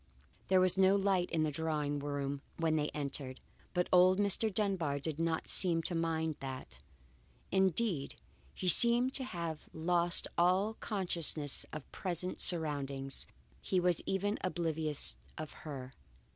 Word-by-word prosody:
There 190 0 +3
was 185 +1 +3
no 190 +1 +5
light 195 -3 0
in 160 -2 -1
the 155 - -1
drawing 150 -1 -2
room 140 -1 -4 0.2
when 165 -1 0
they 150 -1 -1
entered. 140 -3 -4 0.4
But 180 0 0
old 185 +1 +5
Mr. 205 +2 +2
Dunbar 185 -8 -1
did 150 +2 -5
not 165 -1 -2
seem 170 -3 +4
to 180 - -4
mind 160 -2 -2
that. 130 - -8 0.7
Indeed, 190 -4 0 0.4
he 185 - -5
seemed 240 +7 +5
to 265 - +2
have 170 -9 -6
lost 170 +1 +1
all 185 +5 +2
consciousness 170 -9 +1
of 155 -2 -9
present 180 -1 -3
surroundings; 140 -5 +2 0.3
he 185 - -1
was 180 -2 +1
even 205 +2 -1
oblivious 160 -4 +2 0.2
of 155 -1 -7 0.2
her. 130 -2 -8
165 Hz, 140 wpm, -32 LUFS, 150-185 Hz, 0.7 s, no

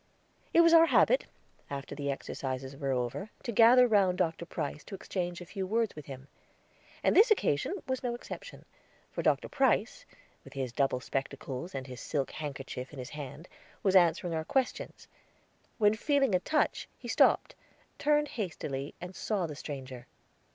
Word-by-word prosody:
It 335 - +6
was 335 0 +6
our 330 0 +8
habit, - - +4 0.4
after 140 -1 -5
the 140 -1 -3
exercises 135 -1 -4
were 135 -1 -2
over, 125 - -2
to 235 - -3
gather 240 +3 +7
round 195 -5 +3
Dr. 170 -2 -1
Price, 145 -2 -4
to 200 - -7
exchange 175 -2 -4
a - - -7
few 190 +1 -4
words 225 +1 0
with 150 -2 -10
him. 135 -1 -9 0.8
And - - +3
this 435 +6 +7
occasion 370 - +2
was 260 -1 -1
no 245 -2 -2
exception, 240 - -9 0.5
for - - -3
Dr. - - +2
Price, 270 - +1 0.4
with - - -13
his 135 -3 -3
double 135 -2 +1
spectacles, 135 +3 -4
and 135 -1 -4
his 125 -2 -9
silk 140 -4 -2
handkerchief 135 -3 -6
in 150 - -11
his 125 -1 -7
hand, 145 +2 -8 0.4
was 195 -1 +3
answering 175 0 +4
our 160 -1 -1
questions, 260 +9 -2 0.7
when 210 -2 +4
feeling 275 0 +2
a 180 - +4
touch, 305 - 0
he - - -10
stopped, - - +3 0.5
turned 295 0 +2
hastily, 150 - -4
and 180 +1 -8
saw 200 -2 -1
the 155 - -5
stranger. 135 -4 -7
170 Hz, 165 wpm, -30 LUFS, 140-225 Hz, 0.8 s, our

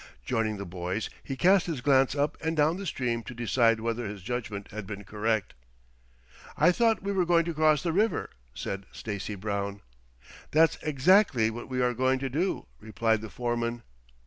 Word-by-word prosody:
Joining 110 - 0
the 100 - -5
boys, 90 +3 -4
he 135 - -4
cast 185 +4 +4
his 160 -6 -2
glance 135 +1 +3
up 145 +1 0
and 160 0 -1
down 155 +3 +3
the 195 -1 -5
stream 120 -5 -1
to 120 +2 -9
decide 115 0 +2
whether 115 0 -2
his 100 -2 -7
judgment 105 -3 -4
had 105 -2 -6
been 100 0 -6
correct. 105 - -1 1.0
"I 165 +4 +5
thought 225 +1 +2
we 200 - -1
were 190 -2 +2
going 170 -1 +3
to 170 - -2
cross 155 -2 +3
the 170 - 0
river," 215 +5 +1 0.2
said 100 0 -5
Stacy 105 -1 -5
Brown. 100 0 -3 0.7
"That's 160 +1 +4
exactly 150 - +4
what 120 +3 -8
we 130 -1 0
are 125 0 +2
going 130 +2 +2
to 135 -1 -4
do," 175 +8 -1
replied 110 0 0
the 110 - -7
foreman. 120 0 -2
120 Hz, 180 wpm, -28 LUFS, 110-155 Hz, 1.0 s, I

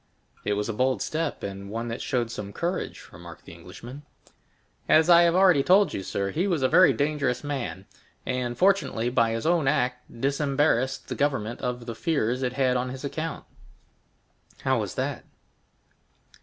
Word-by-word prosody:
"It 105 - 0
was 105 0 -2
a 115 - -2
bold 130 0 +1
step, 160 -1 -3
and 100 0 -6
one 115 +3 -4
that 115 - -5
showed 120 -3 -1
some 105 -3 -6
courage," 175 - -4
remarked - - -12
the - - -11
Englishman. 130 +5 -11 0.9
"As 160 +2 +5
I 170 0 +8
have 170 0 +3
already 185 -6 +5
told 195 +7 +4
you, - - -3
sir, 100 +1 -3
he 180 - 0
was 170 -8 0
a - - +5
very 185 +6 +6
dangerous 145 -3 -1
man; 120 - -4 0.4
and, 125 -2 -2
fortunately, 185 - +2
by 115 -2 +2
his 115 - -3
own 165 -4 +2
act 125 -2 -1
disembarrassed 140 -2 +1
the - - -4
government 135 -6 -1
of 125 -1 -3
the 115 - -5
fears 125 -3 -1
it 125 -1 -1
had 130 -1 +2
on 125 +1 -2
his 130 +2 -7
account." 160 +3 -4 1.2
"How - - +2
was - - -4
that?" - - -3
130 Hz, 170 wpm, -26 LUFS, 115-155 Hz, 1.2 s, I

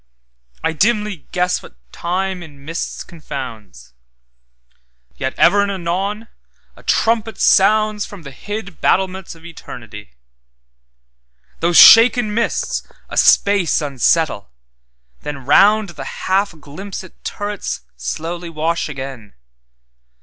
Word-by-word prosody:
I 160 - 0
dimly 210 - 0
guess 180 0 0
what - - -14 0.2
Time 185 +2 -3
in 145 -4 -13
mists 165 +2 -4
confounds; 130 - -9 1.2
Yet 130 0 -3
ever 205 - +5
and 200 - 0
anon 195 +4 -3 0.5
a - - -16
trumpet 225 -1 +1
soundsFrom 210 -1 +2
the 140 - -9
hid 200 +4 -7
battlements 190 -2 0
of 165 +1 -17
Eternity; 110 - -11 1.5
Those 170 0 +2
shaken 230 -1 +8
mists 230 +1 -1 0.3
a - - -7
space 200 -5 +4
unsettle, 145 -4 0 0.7
thenRound 185 +9 +3
the 155 - -7 0.2
half 195 +1 +1
glimpsèd 180 +5 -9
turrets 205 0 -4
slowly 165 - -5
wash 165 +1 -2
again. 130 -7 -8
175 Hz, 100 wpm, -18 LUFS, 145-205 Hz, 1.5 s, shaken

